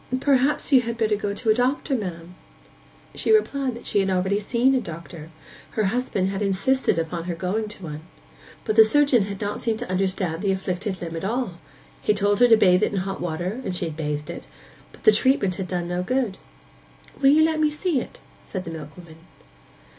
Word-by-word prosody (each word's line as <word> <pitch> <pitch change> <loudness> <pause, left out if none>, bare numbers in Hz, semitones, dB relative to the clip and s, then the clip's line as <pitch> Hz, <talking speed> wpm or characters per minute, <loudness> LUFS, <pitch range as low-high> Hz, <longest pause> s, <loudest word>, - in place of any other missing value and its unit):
'Perhaps 280 +2 +2
you 260 - +7
had 235 -1 -4
better 220 -2 +2
go 205 0 -3
to 220 +2 0
a - - +6
doctor, 260 +5 0
ma'am.' 180 -7 -4 0.8
She - - 0
replied 280 - +2
that 235 - -11
she 205 - +1
had 195 0 +1
already 190 +2 +1
seen 240 +5 +2
a 260 - +2
doctor. 170 -3 -9 0.5
Her 215 - +2
husband 200 -3 0
had 195 +1 -3
insisted 200 +3 +1
upon 165 +1 -3
her 175 -1 -3
going 190 +6 -2
to 210 -2 -8
one. 150 -2 -6 0.6
But 215 -1 -1
the 220 - +11
surgeon 255 -2 +3
had 200 -1 -6
not 205 0 -3
seemed 225 -2 0
to 245 - -6
understand 185 -3 -1
the 200 -2 +1
afflicted 190 0 -3
limb 165 -1 -5
at 165 - -6
all; 210 -4 -2 0.4
he 210 - +2
had - - -5
told 205 0 +2
her 245 - +7
to 225 -2 +7
bathe 180 -3 +4
it - - +1
in 195 - 0
hot 195 +1 -5
water, 175 +8 -3
and 185 - -3
she 175 - -2
had 160 -2 -5
bathed 150 -1 -3
it, - - -9 0.4
but - - -18
the - - +8
treatment 215 -3 +2
had 185 - -4
done 175 -1 -2
no 175 +1 -2
good. 240 0 -1 0.8
'Will 270 - +6
you 305 +3 +6
let 320 -1 0
me 305 -1 +3
see 300 0 0
it?' - - -11 0.2
said 185 -2 -6
the 165 - -6
milkwoman. 160 +1 -10
200 Hz, 215 wpm, -24 LUFS, 180-245 Hz, 0.8 s, the